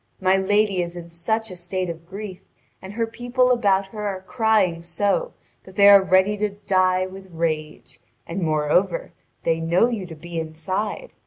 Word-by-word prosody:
My 185 0 +3
lady 200 0 +2
is 170 0 -5
in 170 -1 -9
such 220 +6 -2
a - - -7
state 180 +1 -3
of 165 0 -7
grief, 195 -1 -7 0.4
and 190 +2 -9
her 230 +1 0
people 245 +2 0
about 200 -5 +2
her 210 +1 -7
are 190 -2 -4
crying 215 -7 +1
so 205 - -1 0.3
that 190 - -15
they 200 0 +6
are 200 -1 +9
ready 190 +2 +3
to 210 +1 0
die 185 -2 +1
with 190 0 -11
rage; 155 -2 -4 0.3
and, 175 +3 -4
moreover, 160 - +1 0.3
they 165 -1 +1
know 170 +8 +3
you 210 -6 -4
to 165 - -9
be 170 +2 -6
inside. 185 - -4
190 Hz, 175 wpm, -23 LUFS, 170-210 Hz, 0.4 s, are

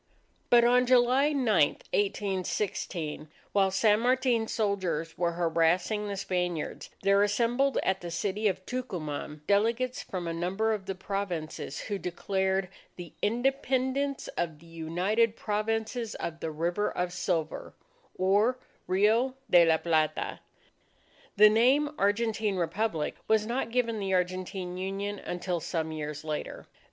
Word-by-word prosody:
But 240 -1 +7
on 250 +1 +4
July 255 +3 +4
9, 275 -4 0 0.5
1816, 190 -6 -2 0.2
while 195 -1 +3
San 210 +2 +3
Martin's 245 -2 +1
soldiers 185 -7 -1
were 170 -1 0
harassing 175 +5 +1
the 200 -1 -4
Spaniards, 180 -4 -2
there 200 +1 +4
assembled 240 +6 +2
at 190 0 0
the 175 - -5
city 200 +5 -1
of 185 -1 -2
Tucuman, 155 - -5
delegates 230 +6 +1
from 180 -3 -5
a 165 - -2
number 195 +6 0
of 200 -3 -5
the 195 - -3
Provinces, 180 -7 -4
who 205 -2 -3
declared 190 +1 -1 0.3
the 175 -3 -9
"Independence 265 +4 0
of 160 -3 -3
the 160 - -18
United 180 +8 0
Provinces 225 +2 -2
of 165 -1 -5
the 160 - -3
River 170 +6 -1
of 180 0 -2
Silver 165 -5 -2 0.4
(or 205 +7 +3 0.3
Rio 220 +8 +3 0.2
de 175 -1 +8
la 160 -1 +4
Plata)." 160 -2 0 1.0
The 210 +1 +9
name 265 +7 +4
"Argentine 210 0 +1
Republic" 175 -2 -1
was 220 -1 +3
not 240 +2 -2
given 230 -2 0
the 195 -1 0
Argentine 180 0 -2
Union 195 +2 -3
until 175 0 -3
some 160 -1 -3
years 150 -1 -5
later. 155 -1 -5
195 Hz, 130 wpm, -29 LUFS, 175-225 Hz, 1.0 s, The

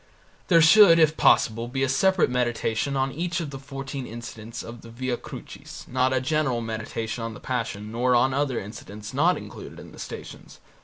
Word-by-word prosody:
There 165 -3 +6
should 170 +1 +8
if 160 -1 +4
possible 115 -4 +3
be 135 +2 -2
a - - +2
separate 190 +5 +3
meditation 125 +2 0
on 135 0 0
each 170 +4 -2
of 155 -4 -4
the 135 - -7
fourteen 135 -1 -6
incidents 115 -1 -8
of 115 0 -9
the 115 - -12
Via 125 +2 -3
Crucis, - - -10
not 130 +1 +1
a 130 - +2
general 135 -2 0
meditation 115 0 -4
on 115 -1 -5
the - - -10
Passion 110 -4 -4
nor 125 +2 +2
on 130 +2 +3
other 140 -3 0
incidents 105 +1 -9
not 165 +7 +3
included - - -10
in - - -12
the - - -14
Stations. - - -9
130 Hz, 190 wpm, -25 LUFS, 115-140 Hz, -, should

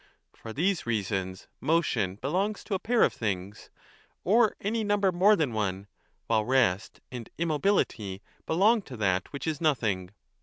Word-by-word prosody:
For 110 - -9
these 175 - 0
reasons 95 -4 -2
motion 125 - +1
belongs 185 - -2
to 210 - -5
a 190 - 0
pair 235 +3 +2
of - - +3
things, 100 -2 -4 0.5
or 220 +3 +4
any 220 +2 -1
number 205 -2 +2
more 190 +4 +5
than 150 - -1
one, 100 -2 -2 0.4
while 110 -2 +2
rest 110 -5 +1
and 120 -3 -7
immobility 150 - 0 0.2
belong 210 +7 +4
to 130 -10 -10
that 95 -3 0
which 140 - -6
is 155 -2 -2
nothing. 110 - 0
135 Hz, 150 wpm, -28 LUFS, -, 0.5 s, more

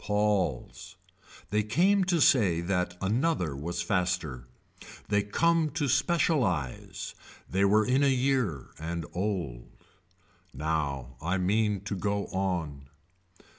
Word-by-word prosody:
Paul's. 105 -5 -1 0.6
They 105 0 +2
came 180 - +3
to 175 -2 +1
say 100 -12 +4
that 90 0 -1
another 105 - 0
was 80 +5 -3
faster. 85 -10 -1 0.6
They 100 -1 +3
come 165 +10 +2
to 150 -3 0
specialize. 135 - 0 0.3
They 95 +1 +1
were 105 +2 +4
in 130 +4 +2
a 140 - +4
year 130 - 0
and 85 0 -4
old. 90 - -3 0.9
Now 70 -5 -2
I 90 +4 0
mean 105 +1 +1
to 100 0 -4
go 100 +1 -1
on. 85 -8 -2
100 Hz, 115 wpm, -28 LUFS, 85-125 Hz, 0.9 s, say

